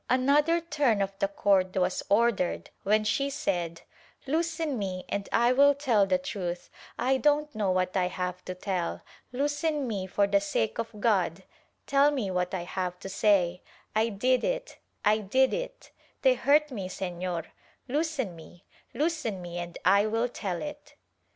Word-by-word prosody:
Another 290 +6 +3
turn 290 -10 +1
of 195 0 -1
the 195 - +2
cord 195 -2 +1
was 180 0 +1
ordered, 210 -3 +1
when 215 +2 +2
she 275 +6 0
said 175 - -2 0.4
"Loosen 320 -2 -1
me 185 -2 -4
and 200 0 -3
I 240 +1 +4
will 285 +2 +6
tell 235 -8 +2
the 185 -1 +3
truth; 180 -2 -5 0.3
I 265 +2 +2
don't 295 +1 +2
know 210 -4 0
what 185 0 0
I 185 -2 +2
have 180 0 -4
to 185 - -5
tell 180 -2 -3
— - - -33
loosen 290 +2 -1
me 195 -5 -3
for 200 +2 +2
the 200 0 +2
sake 195 - -1
of 225 -2 -5
God 190 -5 +1 0.2
— - - -44
tell 280 +1 +4
me 255 -10 -2
what 180 -1 -1
I 185 -3 -3
have 180 0 -3
to 195 - -6
say 190 -3 +2 0.2
— - - -33
I 220 +1 +3
did 250 +5 +1
it, - - -3 0.3
I 210 +1 +4
did 260 +6 +2
it - - -5 0.2
— - - -37
they - - +6
hurt 300 - +3
me 195 -7 -4
Senor 180 -2 -4 0.2
— - - -36
loosen 280 - -1
me, 170 +2 -14 0.3
loosen 300 - -1
me 175 -1 -6
and 175 0 -6
I 200 +3 +5
will 225 +2 +1
tell 190 -7 -4
it." 295 0 -8
210 Hz, 180 wpm, -28 LUFS, 185-280 Hz, 0.4 s, will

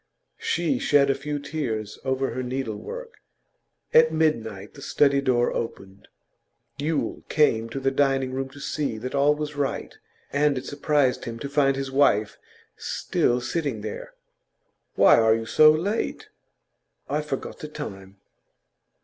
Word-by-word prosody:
She 445 - 0
shed 145 - +4
a - - +2
few 145 +2 -4
tears 125 -8 -4
over 130 0 -1
her 130 +2 -3
needlework. 135 - -5 0.7
At 160 0 +6
midnight 115 -11 -1
the 140 - -13
study 140 0 +2
door 125 -3 +2
opened. 95 -3 -6 0.7
Yule 150 +1 -1
came 115 -7 +2
to 125 - -4
the 135 0 +1
dining 135 -1 +1
room 135 0 -3
to 145 +2 -13
see 140 -5 -2
that 125 +4 -6
all 140 +1 +3
was 150 0 -5
right, 140 -2 -3 0.4
and 145 -1 +2
it 130 - -5
surprised 145 -3 +1
him 115 -1 -5
to 130 - -5
find 140 -1 +2
his 135 0 -4
wife 110 -7 +2 0.4
still 120 +1 0
sitting 135 -3 -2
there. 105 0 -7 0.8
'Why - - +6
are 110 -1 +4
you 115 0 -4
so 155 +7 +6
late?' 175 +8 -1 0.8
'I've 150 +2 -2
forgot 135 - -5
the 150 - -6
time. 100 -10 -8
135 Hz, 145 wpm, -25 LUFS, 120-150 Hz, 0.8 s, At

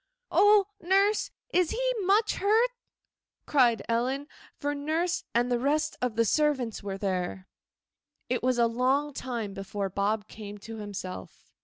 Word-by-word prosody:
'Oh, 410 -1 +6 0.2
nurse, 390 +4 +2 0.2
is 360 -2 +3
he - - 0
much 410 +3 +2
hurt?' 445 +5 +3 0.7
cried 240 -7 +3
Ellen, 255 +5 0 0.3
for 290 0 -2
nurse 320 +5 -1
and 245 +1 +2
the 240 - +2
rest 300 +4 +1
of 250 -3 -1
the 230 0 +3
servants 265 -4 +1
were 195 -1 -4
there. 185 -1 -2 0.8
It 250 - -1
was 255 0 +1
a 235 - +4
long 260 +5 +1
time 235 -6 -4
before 195 0 -4
Bob 205 +2 -1
came 210 -1 -9
to 225 +2 -9
himself. 195 - -8
250 Hz, 145 wpm, -28 LUFS, 210-315 Hz, 0.8 s, Oh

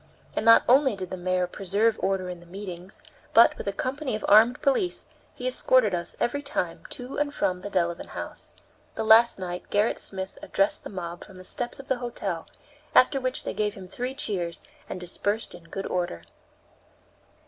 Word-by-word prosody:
And - - 0
not 230 0 +8
only 265 -2 +5
did 185 -2 -6
the - - -2
mayor 180 0 0
preserve 200 +5 0
order 190 -1 0
in 180 -1 -6
the 175 - -17
meetings, 185 0 -8 0.3
but, 230 - +8
with - - -7
a - - +2
company 260 +4 -2
of 215 - -4
armed 225 +4 +6
police, 345 +7 +1 0.3
he - - -3
escorted - - +3
us, - - -3
every 285 +4 0
time, 230 - -2
to 250 +2 -6
and 295 -1 0
from 180 -9 -1
the 205 - -5
Delevan 170 -3 -1
House. - - -6 0.4
The - - -2
last 225 +2 +6
night 180 -1 -5
Gerrit 205 +2 +2
Smith 190 -1 -4
addressed 195 +1 +1
the - - -7
mob 175 -3 -6
from 190 -2 -14
the 185 - -10
steps 240 +7 -4
of 275 - -10
the 260 -2 0
hotel, 200 -8 -4 0.5
after 270 +2 +6
which 255 0 -1
they - - -3
gave 210 -1 -1
him 190 -2 -9
three 250 +7 -4
cheers 180 - -2 0.3
and - - -5
dispersed 205 +5 -2
in 175 -1 -12
good 195 +4 -5
order. 175 - -2
200 Hz, 190 wpm, -26 LUFS, 180-245 Hz, 0.5 s, not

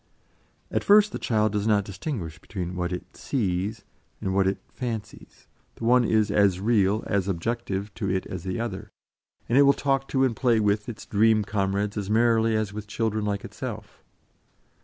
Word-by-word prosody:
At - - 0
first 210 +1 +6
the - - -5
child 110 -2 +1
does 105 0 -1
not 105 -2 +3
distinguish 95 - -5
between 90 -2 -5
what 90 -1 -2
it 90 - -6
"sees" 100 -5 -2 0.4
and 95 - -2
what 95 0 +3
it 95 - 0
"fancies"; 115 -5 -7 0.3
the - - -10
one 125 +2 +5
is 110 -2 +2
as 100 -3 +3
real, 105 -1 +2
as 100 -2 0
objective, 100 +1 -2
to 100 - -3
it 95 0 -1
as 90 -2 -6
the 95 +3 -3
other, 115 -5 -4 0.6
and 125 +4 +3
it - - +8
will 140 0 +6
talk 135 -1 0
to 135 -1 +1
and 125 -4 +1
play 120 -1 +2
with 105 +1 +1
its 115 - -8
dream 110 0 +3
comrades 100 0 -1
as 100 -1 -3
merrily 115 0 +3
as 110 -2 -1
with 105 0 -6
children 110 -1 -1
like 100 -1 -2
itself. - - -7
105 Hz, 180 wpm, -26 LUFS, 95-115 Hz, 0.6 s, it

